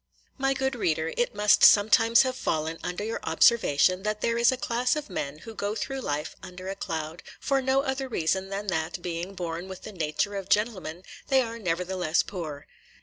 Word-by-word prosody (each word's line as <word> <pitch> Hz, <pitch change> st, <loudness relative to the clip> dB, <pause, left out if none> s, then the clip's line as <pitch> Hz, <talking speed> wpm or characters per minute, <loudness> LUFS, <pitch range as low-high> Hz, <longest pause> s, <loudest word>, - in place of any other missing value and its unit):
MY 270 Hz, 0 st, +1 dB
good 265 Hz, 0 st, 0 dB
reader, 165 Hz, -8 st, -1 dB
it 240 Hz, -3 st, 0 dB
must 210 Hz, 0 st, +4 dB
sometimes 225 Hz, +3 st, +6 dB
have 255 Hz, -1 st, -2 dB
fallen 160 Hz, -8 st, -2 dB
under 180 Hz, +3 st, -3 dB
your 225 Hz, +2 st, -3 dB
observation 185 Hz, 0 st, +3 dB
that 210 Hz, +1 st, -2 dB
there 230 Hz, -, +1 dB
is 235 Hz, +1 st, +4 dB
a 260 Hz, -, -2 dB
class 245 Hz, +1 st, 0 dB
of 300 Hz, -8 st, -5 dB
men 145 Hz, -4 st, -4 dB
who 225 Hz, +8 st, -10 dB
go 205 Hz, 0 st, -3 dB
through 270 Hz, +3 st, -3 dB
life 150 Hz, -, -3 dB
under 185 Hz, +1 st, -8 dB
a 195 Hz, -, -3 dB
cloud, 160 Hz, -2 st, -5 dB, 0.2 s
for 275 Hz, -1 st, +1 dB
no 265 Hz, +1 st, +2 dB
other 265 Hz, -1 st, -2 dB
reason 190 Hz, -3 st, -1 dB
than 200 Hz, +1 st, -4 dB
that, 170 Hz, -1 st, -2 dB
being 175 Hz, +2 st, -4 dB
born 175 Hz, 0 st, -4 dB
with 190 Hz, -1 st, -9 dB
the 215 Hz, -, -7 dB
nature 170 Hz, +2 st, -1 dB
of 195 Hz, -1 st, -5 dB
gentlemen, 185 Hz, -5 st, 0 dB, 0.2 s
they 270 Hz, -1 st, +4 dB
are 230 Hz, 0 st, -6 dB
nevertheless 180 Hz, -3 st, 0 dB
poor. 155 Hz, -7 st, -6 dB
195 Hz, 195 wpm, -27 LUFS, 165-230 Hz, 0.2 s, sometimes